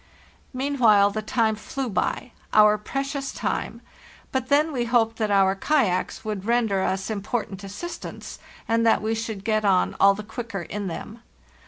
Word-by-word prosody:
Meanwhile 250 -7 +3
the 215 +2 -3
time 220 0 +1
flew 260 +5 -5
by—our 210 0 +1
precious 275 +4 -3
time; - - -3 0.5
but 260 0 -2
then 300 +3 +3
we 245 -4 -1
hoped 230 -2 +2
that 215 -2 0
our 195 -1 +4
kayaks 200 -4 0
would 210 -3 -3
render 225 -4 +1
us 190 +2 -1
im 205 -2 -3
portant 205 -2 -4
assistance, 205 - -7 0.3
and 230 0 +2
that 225 -2 +3
we 220 +1 0
should 220 -3 -4
get 215 0 +1
on 190 -3 +2
all 195 0 +6
the 210 - -7
quicker 215 -4 -6
in 205 +2 -5
them. 215 +6 -7
220 Hz, 160 wpm, -24 LUFS, 200-245 Hz, 0.5 s, all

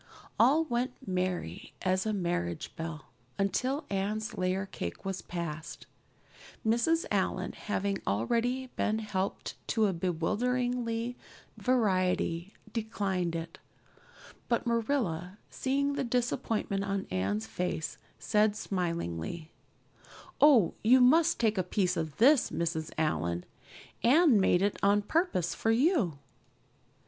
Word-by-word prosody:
All 285 +7 +5
went 250 -3 -1
merry 180 - -3
as 185 +2 +1
a - - +1
marriage 175 -4 -2
bell 160 -3 -6 0.3
until 255 +9 0
Anne's 210 +3 -2
layer 185 +1 0
cake 85 - -6
was 190 -1 -3
passed. 170 -2 -6 0.8
Mrs. 240 +10 +2
Allan, - - 0
having 200 -2 -2
already 235 - 0
been 215 0 +1
helped 200 -3 -3
to 220 -1 +2
a 195 - +1
bewildering 230 +7 -1 0.4
variety, 185 -6 +1 0.2
declined 195 -6 -1
it. 165 0 -6 0.9
But 235 0 +1
Marilla, 220 - -1
seeing 280 +2 0
the 280 -1 -1
disappointment 235 -5 -1
on 195 -1 -2
Anne's 100 +4 -1
face, 160 +6 -3 0.2
said 210 -1 +2
smilingly: 170 - -3 0.9
"Oh, 265 - +6
you 250 +4 +6
must 300 +6 +5
take 220 -4 +2
a - - +2
piece 180 0 0
of 160 -3 -3
this, 270 +3 +5
Mrs. 160 -2 -2
Allan. 85 - 0 0.6
Anne 275 - +5
made 190 -1 +3
it 205 - +1
on 205 +1 +3
purpose 205 - 0
for 225 - -1
you." 230 - +2
200 Hz, 115 wpm, -30 LUFS, 170-240 Hz, 0.9 s, Oh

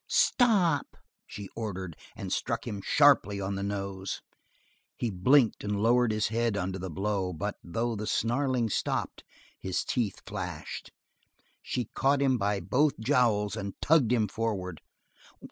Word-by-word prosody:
"Stop!" 195 - +3 0.3
she 100 -1 -7
ordered, 95 -7 -4 0.2
and - - -4
struck - - -2
him 100 -1 -4
sharply 135 -7 +4
on 95 0 -2
the 100 - -3
nose. 100 -1 -3 0.8
He 120 - -1
blinked 115 +6 +3
and 105 0 -1
lowered 120 +2 +3
his 110 -1 0
head 115 -1 0
under 95 0 -2
the 95 +1 -5
blow, 95 +1 -1
but 80 - -3
though 115 +7 -2
the 105 0 -4
snarling 120 +2 +1
stopped - - -2 0.4
his 95 - -2
teeth 110 -6 -1
flashed. - - -6 0.7
She 125 - -2
caught 140 +1 +2
him 130 -3 +2
by 100 0 +1
both 135 - +1
jowls 110 -5 +2
and 100 0 -5
tugged 145 -7 +4
him 115 -4 +3
forward. 95 -6 -3
105 Hz, 145 wpm, -29 LUFS, 100-125 Hz, 0.8 s, sharply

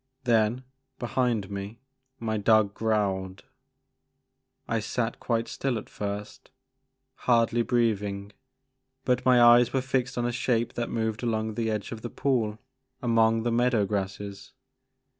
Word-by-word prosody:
Then, 115 +1 +2 0.3
behind 120 -5 -1
me, 100 +3 -6 0.4
my 110 -1 -2
dog 105 -1 +3
growled. 100 -4 -1 1.2
I 115 - 0
sat 115 +2 -2
quite 115 -1 -1
still 135 -4 -2
at 110 - -8
first, 105 0 -6 0.8
hardly 120 -1 +3
breathing, 105 -4 0 0.7
but 125 -1 +1
my 125 -1 +6
eyes 120 0 +6
were 135 - +2
fixed 130 -1 -1
on 120 - 0
a 120 - 0
shape 120 -1 0
that 120 -1 -3
moved 110 -1 -2
along 110 -2 -1
the 115 +1 -1
edge 105 -2 -3
of 115 -2 -6
the 120 - -5
pool 115 -6 0 0.4
among 115 -2 +2
the 120 - 0
meadow 120 -3 +2
grasses. 100 0 -4
115 Hz, 135 wpm, -27 LUFS, 105-120 Hz, 1.2 s, my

